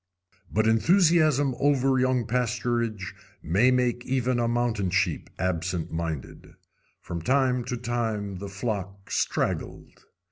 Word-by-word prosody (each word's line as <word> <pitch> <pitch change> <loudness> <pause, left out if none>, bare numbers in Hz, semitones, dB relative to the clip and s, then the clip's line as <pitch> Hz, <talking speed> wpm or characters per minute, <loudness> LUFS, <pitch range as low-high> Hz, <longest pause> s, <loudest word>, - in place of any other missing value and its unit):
But 110 +2 +1
enthusiasm 155 - +4
over 135 -2 +3
young 130 -2 +1
pasturage 115 -4 -1 0.3
may 100 +10 +3
make 125 -1 +1
even 130 -1 0
a 120 - +1
mountain 115 -5 0
sheep 95 -3 0
absent 90 -1 -2
minded. 80 -5 -5 0.5
From 85 -1 -5
time 130 +4 +2
to 125 0 -3
time 110 -5 -2
the 100 +1 -6
flock 100 -1 -5
straggled. - - -2
120 Hz, 115 wpm, -26 LUFS, 95-125 Hz, 0.5 s, enthusiasm